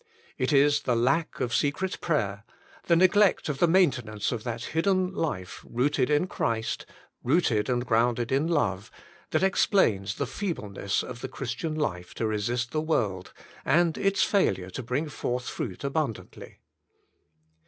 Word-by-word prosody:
It - - +1
is 145 +1 +4
the 125 - 0
lack 135 +8 +1
of 120 -2 -1
secret 155 +9 0
prayer, 100 - -1 0.4
the 170 - +5
neglect 185 +1 +4
of 140 -2 -3
the 175 - +5
maintenance 130 - +2
of 115 -4 -4
that 115 -2 -4
hidden 185 +2 +1
life 120 - -4
"Booted 130 +2 0
in 150 +4 +3
Christ," 115 -10 -2 0.4
"Eooted 130 -6 +2
and 120 -1 0
grounded 120 0 +1
in 140 +4 +2
love," 105 - 0 0.4
that - - +1
explains 115 - +2
the 140 - -2
feebleness 115 - -3
of 125 -1 -8
the - - -3
Christian 135 +5 -4
life 90 - -3
to 115 - -2
resist 115 +3 -1
the 155 - 0
world, 105 - -1 0.3
and 170 +2 +3
its 195 0 +2
failure 95 - +1
to 130 - -5
bring 130 +6 -2
forth 125 -3 -3
fruit 95 -1 -5
abundantly. 140 -5 -4
130 Hz, 150 wpm, -27 LUFS, 115-160 Hz, 0.4 s, the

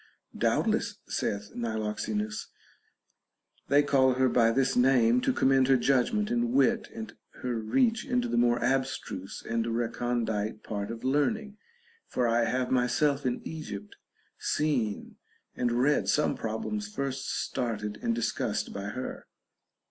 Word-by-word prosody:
Doubtless, - - +1
saith 100 0 -2
Niloxenus, 110 -2 -3 1.2
they 145 +1 +5
call 130 -3 +3
her 130 0 +3
by 115 -2 +4
this 130 +3 +1
name 125 -1 +4
to - - +2
commend 130 -1 +3
her 135 -1 +5
judgment 140 - +1
and 240 0 +1
wit, 235 -4 +3
and 225 0 -7 0.3
her 125 -2 -1
reach 225 - +2
into 250 -2 0
the - - -2
more 120 0 +3
abstruse 130 -7 -2
and 115 0 0
recondite 115 -2 -1
part 100 -2 -4
of 115 0 -6
learning; 205 - 0 0.5
for 125 -1 0
I 115 0 +3
have 125 +2 -1
myself 130 +3 +2
in 125 - -3
Egypt 105 -11 -7 0.4
seen 130 -9 -1 0.4
and 120 -1 0
read 130 +5 +2
some 150 - +2
problems 160 - -3
first 135 -7 -3
started 105 -4 -2
and 115 - 0
discussed 115 -1 -1
by 100 0 -5
her. 125 +6 -5
125 Hz, 135 wpm, -29 LUFS, 115-140 Hz, 1.2 s, they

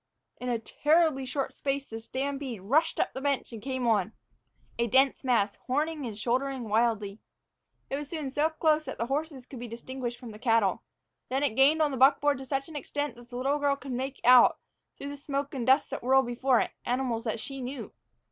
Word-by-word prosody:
In 250 - -4
a 240 - +1
terribly 295 +3 +2
short 270 +1 -2
space 275 -1 -3
the 225 - -5
stampede 265 -2 -4
rushed 310 +10 +2
up - - 0
the 265 - -5
bench 280 -3 -1
and 225 - -7
came 260 +1 -3
on, 220 -2 +2 0.7
a 235 - +2
dense 265 +5 +3
mass, 230 -6 +1
horning 295 +1 -1
and 215 -3 -7
shouldering 255 +3 -1
wildly. 215 -2 +1 0.7
It 275 - -2
was 290 -1 -6
soon 300 -5 -4
so 295 +3 +2
close 315 -1 +1
that - - -6
the 230 - -1
horses 275 0 -3
could 255 - -10
be 245 - -6
distinguished 240 +1 -5
from 240 -2 -9
the 210 - -11
cattle. 225 -5 +2 0.5
Then 270 +2 0
it 280 - +1
gained 295 +5 +5
on 295 - +1
the 265 - -3
buckboard 280 +1 +4
to 265 - -7
such 270 0 -2
an 320 - -11
extent 290 -2 -3
that 240 0 -15
the 245 - -6
little 275 +3 0
girl 285 -1 +2
could 280 -1 -9
make 265 +2 -3
out, 250 0 +7 0.4
through 280 - -6
the 285 - -7
smoke 280 0 -3
and 255 -3 -3
dust 270 +2 +4
that 275 - -4
whirled 265 +2 +4
before 245 +1 +2
it, - - -2
animals 245 -2 -1
that 225 0 -2
she 270 +3 -6
knew. 260 +2 -6
265 Hz, 215 wpm, -28 LUFS, 240-280 Hz, 0.7 s, out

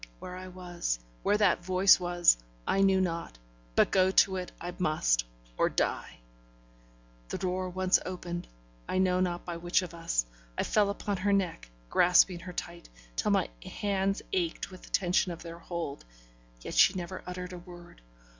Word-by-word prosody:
Where 180 - -8
I 185 0 -8
was, 175 - -3 0.2
where 205 - +2
that 205 -4 +3
voice 185 +2 +5
was, 175 - +4 0.3
I 195 - +2
knew 195 -1 +4
not; 170 - -2 0.4
but - - +4
go 185 -1 +4
to 190 0 +4
it 180 -1 -5
I 175 +1 -5
must, - - +2 0.3
or - - +4
die. - - -2 1.1
The - - -3
door 185 0 -2
once 185 +1 +2
opened 175 -1 -5 0.4
I - - 0
know 185 -1 +3
not 175 -1 -1
by 175 -1 -4
which 175 +2 +1
of 175 - -7
us 165 - 0 0.3
I - - +1
fell 210 -2 +2
upon 200 0 -2
her 200 +2 +1
neck, 180 - -1 0.2
grasping 180 0 +5
her 180 +1 -8
tight, 170 0 -7 0.3
till - - 0
my - - +3 0.2
hands 195 -1 -1
ached 175 +1 -1
with 185 - -11
the - - -14
tension 180 0 +2
of 165 - -10
their 170 0 -8
hold. 165 -4 -5 0.6
Yet - - -6
she 190 - +6
never 185 +1 -5
uttered 180 0 -6
a 180 - -7
word. 175 -1 -13
180 Hz, 175 wpm, -30 LUFS, 175-185 Hz, 1.1 s, she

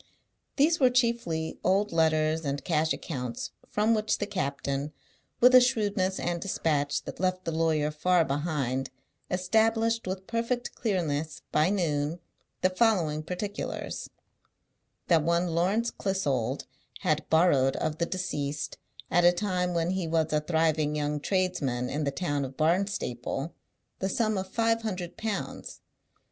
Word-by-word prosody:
These 315 +4 +3
were 260 -3 +6
chiefly 235 -10 0
old 200 +3 +2
letters 160 -1 +2
and 140 -1 -3
cash 160 -2 +1
accounts; 125 -7 -4 0.2
from 215 +2 +2
which 215 -1 +1
the 205 - -2
captain, 140 -6 -2 0.5
with 250 +1 +7
a 255 - +10
shrewdness 205 -6 +1
and 170 -1 -2
despatch 145 -6 0
that - - -8
left 185 0 0
the 165 - -1
lawyer 160 -2 +1
far 170 +2 +2
behind, 135 -3 -1 0.4
established 225 +4 +2
with 190 0 -4
perfect 235 +2 -2
clearness, 160 -8 -2
by 155 +3 +3
noon, 160 -4 0 0.4
the 185 - +4
following 185 -8 +2
particulars: 185 +5 -4 1.0
That 165 -3 +5
one 170 +3 +1
Lawrence 200 +8 +1
Clissold 140 - -1 0.4
had 155 0 0
borrowed 145 -5 +4
of 155 0 -2
the 170 - +1
deceased, 150 -6 -3 0.3
at 175 - +4
a 175 - +8
time 180 -1 -1
when 170 +1 +1
he 185 -3 -1
was 160 -1 +1
a 150 - +2
thriving 155 -1 +1
young 150 0 -1
tradesman 145 -9 -1
in 150 +1 -1
the - - +1
town 145 -1 -1
of 130 0 -7
Barnstaple, 160 -5 -1 0.5
the 190 - -1
sum 215 +1 +1
of 190 -1 -3
five 230 +2 +1
hundred 185 -6 -4
pounds. 220 -2 -4
170 Hz, 140 wpm, -28 LUFS, 150-195 Hz, 1.0 s, a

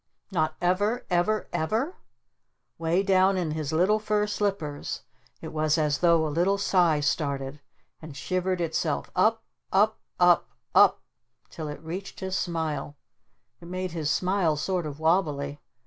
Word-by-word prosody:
"Not 155 -3 0
ever? 205 +7 +1
Ever? 195 +5 +1
Ever?" 220 - -1 0.8
Way 165 +4 +1
down 190 0 +4
in 170 -4 -1
his 155 -1 -3
little 185 +7 +3
fur 210 -1 +1
slippers 200 -8 -3 0.4
it - - -6
was 155 0 +1
as 150 -2 +1
though 170 -2 +4
a - - -1
little 180 +5 +2
sigh 175 -6 +3
started 140 -1 -2 0.4
and 155 -3 -9
shivered 185 +5 -1
itself 160 -2 -1
up 220 +5 +3 0.3
up 210 +3 +3 0.2
up 175 -1 +5 0.2
up - - +6 0.5
till 160 -2 -6
it 150 - -6
reached 180 +5 -6
his 190 -1 -3
smile. 155 -5 -2 0.6
It 170 - -12
made 185 0 -3
his 160 -3 -2
smile 180 -1 +1
sort 175 +2 -1
of 145 0 -7
wobbly. 150 -4 +1
175 Hz, 145 wpm, -27 LUFS, 155-190 Hz, 0.8 s, up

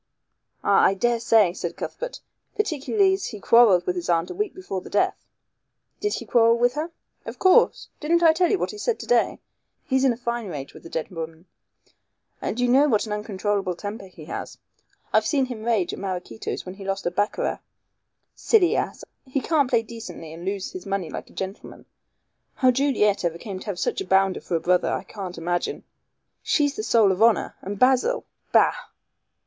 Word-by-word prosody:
"Ah, - - +4
I 195 - +4
daresay," 225 -3 +3
said - - -5
Cuthbert, - - -6 0.4
"particularly 390 +1 +2
as 385 - -2
he 215 - -7
quarrelled 200 -5 +5
with 180 - -1
his 175 -1 -4
aunt 170 0 +1
a - - -4
week 420 -1 -3
before 280 - -5
the - - -11
death." 205 - 0 0.7
"Did 415 0 -1
he - - -6
quarrel 230 -1 +4
with 245 +1 +2
her?" 305 +4 -3 0.3
"Of - - -8
course. 375 -1 +4
Didn't 340 +3 +2
I 325 -1 +7
tell 350 +1 +2
you 405 - +2
what - - -2
he 420 - -10
said 465 +1 -1
to - - -7
day. - - +2 0.5
He's 265 0 +1
in 265 - +5
a 235 - -3
fine 235 -2 -3
rage 140 -6 -6
with - - -12
the 165 - -11
dead 160 +1 -4
woman. 165 0 -7 1.0
And 230 - -3
you 245 - +2
know 270 +4 +5
what 220 -6 +2
an 215 - -7
uncontrollable 205 -2 -2
temper 205 +2 -7
he 170 -4 -13
has. - - -6 0.6
I've - - +3
seen 275 -4 +2
him 240 -4 -7
rage 220 -6 +1
at - - -6
Maraquito's 180 - -5
when 185 - -7
he 195 +1 -10
lost 195 0 -3
at 175 0 -2
baccarat. 205 +1 0 0.7
Silly 390 -7 +3
ass! - - -2 0.2
He 260 +1 -1
can't 285 -2 +1
play 235 -3 +2
decently 200 -8 -9
and 165 +1 -9
lose 195 0 -3
his 185 +1 -8
money 195 -5 -2
like - - -7
a - - -18
gentleman. 190 +1 -7 0.7
How 255 -2 +4
Juliet 240 -7 +2
ever 170 -1 -1
came 190 +1 -7
to - - -11
have 200 -3 -3
such - - -1
a 195 - -6
bounder 190 0 +3
for 175 - -3
a - - +2
brother 180 +2 +2
I - - -2
can't 190 -4 -7
imagine. 175 +1 -2 0.6
She's 290 -2 +1
the - - -3
soul 220 -2 +4
of 190 +2 -2
honor, 230 -1 +3
and 200 +1 -5
Basil 265 - +3 0.3
bah!" - - +5
215 Hz, 200 wpm, -24 LUFS, 185-265 Hz, 1.0 s, I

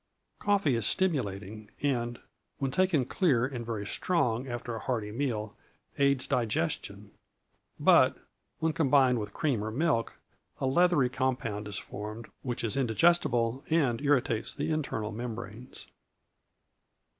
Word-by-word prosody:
Coffee 200 -10 +2
is 115 -2 0
stimulating, 110 - -1
and, 120 -4 0 0.4
when 135 -2 -1
taken 180 -6 +2
clear 130 - +2
and 130 -3 -4
very 110 -3 -4
strong 125 - 0
after 120 -1 -4
a - - -4
hearty 110 -5 -2
meal, 110 -4 -2 0.4
aids 140 -2 +3
digestion; 110 -8 -2 0.7
but, - - +5 0.4
when 160 0 0
combined 135 -5 +4
with 105 -1 -5
cream 125 -4 0
or 110 - -2
milk, 120 -1 0 0.5
a - - -1
leathery 150 0 +4
compound 125 -5 -2
is 105 - -5
formed, 105 +2 -7
which 120 -3 -4
is 115 - -1
indigestible 130 -2 +2
and 140 -8 +2
irritates 135 -5 +1
the - - -2
internal 125 -8 -2
membranes. 115 +1 -7
125 Hz, 125 wpm, -29 LUFS, 110-140 Hz, 0.7 s, but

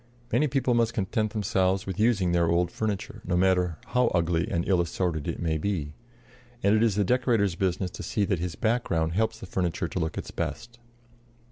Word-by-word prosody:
Many 150 - +3
people 130 -2 +1
must 115 -1 +1
content 110 0 0
themselves 95 -2 +1
with 95 +1 -5
using 105 -6 +3
their 85 -1 +2
old 85 +1 +2
furniture, 105 -3 -3
no 90 - 0
matter 90 -3 +2
how 125 0 +3
ugly 85 -1 +1
and 85 0 -1
ill 95 -3 +3
assorted 85 -2 -2
it - - -3
may 80 -2 0
be; 80 -5 -2 0.7
and 100 - +4
it 110 - +3
is 115 -4 +3
the 105 - +2
decorator's 115 -3 +2
business 90 +1 -1
to - - -8
see 105 - 0
that 95 -2 0
his 85 -2 -3
background 90 -8 0
helps 110 +3 0
the - - -8
furniture 90 -1 -1
to 90 - -4
look 80 -1 -2
its - - -5
best. 120 +1 -5
95 Hz, 200 wpm, -27 LUFS, 85-110 Hz, 0.7 s, and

